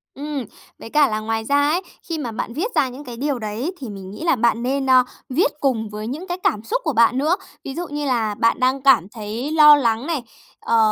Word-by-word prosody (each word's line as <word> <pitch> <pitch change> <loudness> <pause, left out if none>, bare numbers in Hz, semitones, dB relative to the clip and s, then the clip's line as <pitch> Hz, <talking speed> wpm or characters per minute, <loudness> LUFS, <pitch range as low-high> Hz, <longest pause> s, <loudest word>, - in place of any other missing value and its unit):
Ừm, 285 -2 -4 0.3
với - - -9
cả 295 +3 +4
là 215 0 -1
ngoài 225 +1 -2
ra 285 +1 +3
ấy, 345 +4 +1 0.3
khi 330 - -2
mà 255 -7 -4
bạn 230 +1 -4
viết 370 - -3
ra 265 - +3
những 260 +4 -9
cái 245 -4 -8
điều 275 0 -1
đấy 220 +9 -3
thì 255 - -6
mình 195 -2 -8
nghĩ 210 - -8
là 335 -4 +3
bạn 235 -1 +1
nên, 270 +1 -1
a, 255 -1 +7 0.3
viết 295 +4 +2
cùng 235 -7 0
với 210 +1 -6
những 305 +10 -5
cái 355 - -3
cảm 210 0 +1
xúc - - -1
của - - -1
bạn 230 +2 +4
nữa. 305 +6 +2 0.3
Ví 270 - -6
dụ 350 +1 -4
như 290 0 -4
là 230 -6 0
bạn 230 +1 +2
đang 260 +1 +1
cảm 260 -9 +5
thấy 225 +5 -5
lo 300 -2 +8
lắng 235 -1 0
này, 315 -7 -2 0.4
ờ, 230 - +1
260 Hz, 245 wpm, -21 LUFS, 225-295 Hz, 0.4 s, lo